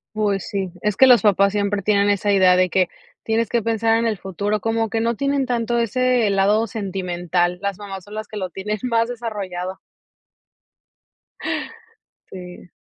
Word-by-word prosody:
Pues 205 Hz, -3 st, -1 dB
sí, 190 Hz, -3 st, -3 dB
es 210 Hz, 0 st, -1 dB
que 265 Hz, -, +7 dB
los 245 Hz, -4 st, +7 dB
papás 200 Hz, -1 st, +4 dB
siempre 205 Hz, -1 st, -1 dB
tienen 200 Hz, +1 st, +2 dB
esa 205 Hz, 0 st, +1 dB
idea 185 Hz, -2 st, +5 dB
de 185 Hz, 0 st, +2 dB
que 185 Hz, 0 st, +2 dB, 0.4 s
tienes 225 Hz, 0 st, 0 dB
que 235 Hz, -2 st, +1 dB
pensar 225 Hz, 0 st, +1 dB
en 230 Hz, -, 0 dB
el 220 Hz, -2 st, 0 dB
futuro, 200 Hz, +3 st, -3 dB
como 225 Hz, 0 st, 0 dB
que 225 Hz, +1 st, -1 dB
no 235 Hz, 0 st, 0 dB
tienen 280 Hz, +1 st, 0 dB
tanto 240 Hz, -1 st, -1 dB
ese 245 Hz, 0 st, +2 dB
lado 200 Hz, +3 st, +2 dB
sentimental, 180 Hz, -4 st, -2 dB
las 200 Hz, -2 st, -3 dB
mamás 195 Hz, -3 st, -8 dB
son 205 Hz, -, -12 dB
las 215 Hz, 0 st, -5 dB
que 210 Hz, -, -7 dB
lo 185 Hz, -2 st, -3 dB
tienen 210 Hz, +4 st, -4 dB
más 230 Hz, -1 st, +1 dB
desarrollado. 195 Hz, -6 st, -5 dB, 2.5 s
Sí. 180 Hz, -1 st, -10 dB
205 Hz, 170 wpm, -21 LUFS, 190-225 Hz, 2.5 s, que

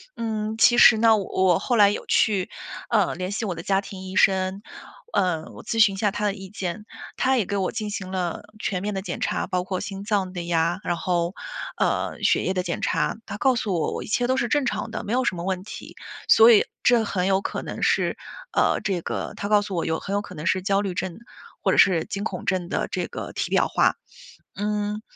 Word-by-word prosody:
嗯， 220 Hz, -1 st, -3 dB
其 240 Hz, +1 st, +5 dB
实 220 Hz, -, +8 dB
呢， 225 Hz, 0 st, +5 dB
我 190 Hz, -3 st, +2 dB
后 245 Hz, -, 0 dB
来 205 Hz, -3 st, +6 dB
有 205 Hz, -, -4 dB
去， 195 Hz, -4 st, +2 dB, 0.4 s
嗯， 205 Hz, -8 st, +2 dB
联 185 Hz, +1 st, -3 dB
系 215 Hz, -, -3 dB
我 195 Hz, -4 st, -2 dB
的 165 Hz, 0 st, -8 dB
家 195 Hz, 0 st, +1 dB
庭 195 Hz, -1 st, -9 dB
医 190 Hz, -, -7 dB
生， 190 Hz, 0 st, +2 dB, 0.5 s
嗯， 175 Hz, -4 st, +1 dB
我 -, -, -9 dB
咨 225 Hz, -, -3 dB
询 205 Hz, -3 st, +5 dB
一 -, -, -8 dB
下 205 Hz, +1 st, +2 dB
他 210 Hz, +1 st, -4 dB
的 205 Hz, -1 st, +1 dB
意 195 Hz, -2 st, -10 dB
见。 200 Hz, +1 st, -5 dB, 0.3 s
他 265 Hz, 0 st, +2 dB
也 225 Hz, -, +1 dB
给 205 Hz, -, -2 dB
我 190 Hz, -2 st, 0 dB
进 215 Hz, -2 st, -3 dB
行 190 Hz, -2 st, -5 dB
了 180 Hz, -2 st, -3 dB, 0.2 s
全 185 Hz, -4 st, -2 dB
面 210 Hz, +1 st, -2 dB
的 195 Hz, -, -3 dB
检 190 Hz, -, -5 dB
查， -, -, -1 dB
包 180 Hz, 0 st, -2 dB
括 185 Hz, -1 st, -3 dB
心 195 Hz, -1 st, -6 dB
脏 200 Hz, -3 st, 0 dB
的 180 Hz, -2 st, -5 dB
呀， 170 Hz, +1 st, +1 dB
然 175 Hz, -, 0 dB
后， 175 Hz, 0 st, -1 dB, 0.5 s
嗯， -, -, 0 dB
血 -, -, +3 dB
液 190 Hz, -, 0 dB
的 185 Hz, -1 st, -1 dB
检 175 Hz, -, -3 dB
查， -, -, 0 dB
他 205 Hz, -, -6 dB
告 260 Hz, +4 st, +3 dB
诉 210 Hz, -4 st, -1 dB
我， 165 Hz, -3 st, 0 dB
我 -, -, -4 dB
一 -, -, -10 dB
切 245 Hz, +3 st, +1 dB
都 260 Hz, -, +1 dB
是 240 Hz, -, +1 dB
正 290 Hz, +3 st, +1 dB
常 235 Hz, -, -2 dB
的， -, -, -5 dB
没 205 Hz, -, -5 dB
有 255 Hz, 0 st, +1 dB
什 190 Hz, -, 0 dB
么 170 Hz, -, -5 dB
问 185 Hz, 0 st, -2 dB
题。 220 Hz, -, -10 dB, 0.3 s
所 225 Hz, +1 st, +8 dB
以 210 Hz, -, +5 dB, 0.2 s
这 240 Hz, -2 st, +4 dB
很 190 Hz, -3 st, -1 dB
有 195 Hz, 0 st, +2 dB
可 -, -, -4 dB
能 -, -, -6 dB
是， -, -, +1 dB, 0.4 s
呃， -, -, +2 dB
这 190 Hz, -4 st, -1 dB
个 -, -, -4 dB
他 200 Hz, -, -4 dB
告 210 Hz, -1 st, +5 dB
诉 205 Hz, -2 st, -5 dB
我 170 Hz, -, -1 dB
有 160 Hz, 0 st, -1 dB
很 195 Hz, -, -5 dB
有 205 Hz, -, +1 dB
可 205 Hz, -, -11 dB
能 150 Hz, +1 st, -7 dB
是 185 Hz, +2 st, +2 dB
焦 195 Hz, +1 st, +1 dB
虑 195 Hz, -3 st, -3 dB
症， 185 Hz, -2 st, -3 dB, 0.4 s
或 -, -, +2 dB
者 -, -, +1 dB
是 175 Hz, -4 st, +5 dB
惊 200 Hz, -, -4 dB
恐 190 Hz, -4 st, -4 dB
症 185 Hz, -2 st, 0 dB
的 -, -, -1 dB
这 -, -, -2 dB
个 -, -, -7 dB
体 -, -, -2 dB
表 -, -, +3 dB
化。 -, -, +2 dB, 0.6 s
嗯， 210 Hz, 0 st, -2 dB
195 Hz, 260 characters per minute, -24 LUFS, 185-210 Hz, 0.6 s, 实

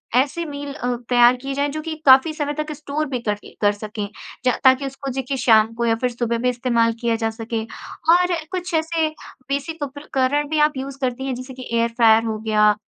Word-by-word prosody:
ऐसी 280 Hz, +6 st, +1 dB
मील 285 Hz, -2 st, -6 dB
अ, 245 Hz, -3 st, -2 dB
तैयार 245 Hz, 0 st, +6 dB
की 275 Hz, +1 st, -4 dB
जाए, 285 Hz, +1 st, 0 dB
जो 310 Hz, +2 st, -4 dB
कि 320 Hz, 0 st, -5 dB
काफ़ी 265 Hz, +4 st, +7 dB
समय 295 Hz, -2 st, -2 dB
तक 305 Hz, 0 st, -5 dB
स्टोर 300 Hz, +1 st, -3 dB
भी 255 Hz, -2 st, -2 dB
कर 215 Hz, -3 st, -1 dB
करके 205 Hz, -, -13 dB
कर 205 Hz, -1 st, +4 dB
सकें, 210 Hz, 0 st, -5 dB, 0.4 s
ज 250 Hz, -, +4 dB
ताकि 260 Hz, +1 st, +5 dB
उसको, 270 Hz, 0 st, -5 dB
देखिए, 265 Hz, +1 st, -3 dB
शाम 225 Hz, -3 st, +4 dB
को 235 Hz, +1 st, -2 dB
या 225 Hz, -1 st, +3 dB
फिर 250 Hz, -, +2 dB
सुबह 235 Hz, -1 st, -1 dB
भी 250 Hz, +2 st, +1 dB
इस्तेमाल 235 Hz, -2 st, +1 dB
किया 235 Hz, -1 st, +1 dB
जा 225 Hz, -, +2 dB
सके। 225 Hz, 0 st, -3 dB, 0.5 s
और 360 Hz, 0 st, +2 dB, 0.2 s
कुछ 360 Hz, -1 st, -4 dB
ऐसे 320 Hz, 0 st, +1 dB, 0.4 s
बेसिक 290 Hz, +3 st, -3 dB
उपकरण 285 Hz, 0 st, -1 dB
भी 310 Hz, 0 st, 0 dB
आप 300 Hz, -2 st, -10 dB
यूज़ 270 Hz, +1 st, -5 dB
करती 260 Hz, 0 st, -2 dB
हैं, 260 Hz, -, -2 dB
जैसे 255 Hz, +2 st, -8 dB
कि 255 Hz, 0 st, -9 dB
एयर 230 Hz, 0 st, +2 dB
फ्रायर 225 Hz, -1 st, +6 dB
हो 220 Hz, -1 st, -2 dB
गया, 210 Hz, -1 st, +3 dB
260 Hz, 220 wpm, -21 LUFS, 235-290 Hz, 0.5 s, काफ़ी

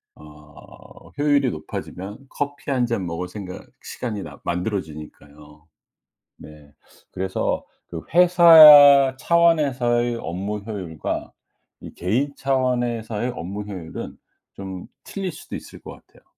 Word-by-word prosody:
어 75 Hz, -1 st, -17 dB
효율이 145 Hz, -3 st, +2 dB
높아지면 95 Hz, +6 st, -8 dB
커피 145 Hz, 0 st, -5 dB
1 125 Hz, -2 st, +1 dB
잔 110 Hz, -6 st, -3 dB
먹을 85 Hz, +2 st, -5 dB
생각 90 Hz, -1 st, -9 dB, 0.2 s
시간이 105 Hz, -5 st, -6 dB
남 70 Hz, -2 st, -11 dB
만들어지니까요. 75 Hz, -5 st, -7 dB, 0.7 s
네 75 Hz, -1 st, -15 dB, 0.4 s
그래서 95 Hz, 0 st, -3 dB, 0.2 s
그 85 Hz, -2 st, -7 dB
회사 155 Hz, -6 st, +8 dB
차원에서의 130 Hz, -9 st, +1 dB
업무 100 Hz, +2 st, -5 dB
효율과 95 Hz, -7 st, -6 dB, 0.5 s
이 -, -, -11 dB
개인 125 Hz, +11 st, -1 dB
차원에서의 120 Hz, -3 st, -2 dB
업무 100 Hz, +5 st, -6 dB
효율은 95 Hz, -6 st, -8 dB, 0.4 s
좀 95 Hz, -2 st, -8 dB, 0.2 s
틀릴 195 Hz, -3 st, -5 dB
수도 -, -, -10 dB
있을 -, -, -11 dB
것 -, -, -10 dB
같아요. -, -, -21 dB
105 Hz, 245 characters per minute, -22 LUFS, 90-135 Hz, 0.7 s, 회사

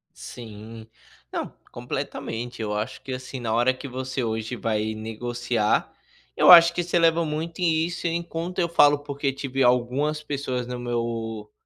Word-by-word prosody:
Sim, 110 Hz, -1 st, -10 dB, 0.4 s
não, -, -, -4 dB, 0.2 s
completamente 120 Hz, +1 st, -5 dB
eu 105 Hz, -1 st, -2 dB
acho 105 Hz, +1 st, -3 dB
que, 135 Hz, -, -5 dB
assim, 130 Hz, +1 st, -6 dB
na 115 Hz, -2 st, -2 dB
hora 120 Hz, +3 st, +3 dB
que 130 Hz, +2 st, -8 dB
você 130 Hz, 0 st, -3 dB
hoje 110 Hz, +1 st, -2 dB
vai 110 Hz, -1 st, -1 dB
negociar, 115 Hz, 0 st, -1 dB, 0.4 s
eu -, -, +5 dB
acho 170 Hz, -1 st, +10 dB
que 175 Hz, -, 0 dB
isso 175 Hz, +1 st, -3 dB
eleva 165 Hz, 0 st, +4 dB
muito 160 Hz, +2 st, -4 dB
e 160 Hz, -2 st, +3 dB
isso 175 Hz, 0 st, -3 dB
enquanto 170 Hz, +1 st, -3 dB
eu 170 Hz, -, +2 dB
falo, 145 Hz, -3 st, +5 dB
porque 140 Hz, -1 st, -2 dB
tive 135 Hz, 0 st, -3 dB
algumas 130 Hz, +5 st, +1 dB
pessoas 135 Hz, -4 st, -3 dB
no 125 Hz, 0 st, -5 dB
meu 115 Hz, -3 st, -3 dB
125 Hz, 160 wpm, -25 LUFS, 115-150 Hz, 0.4 s, acho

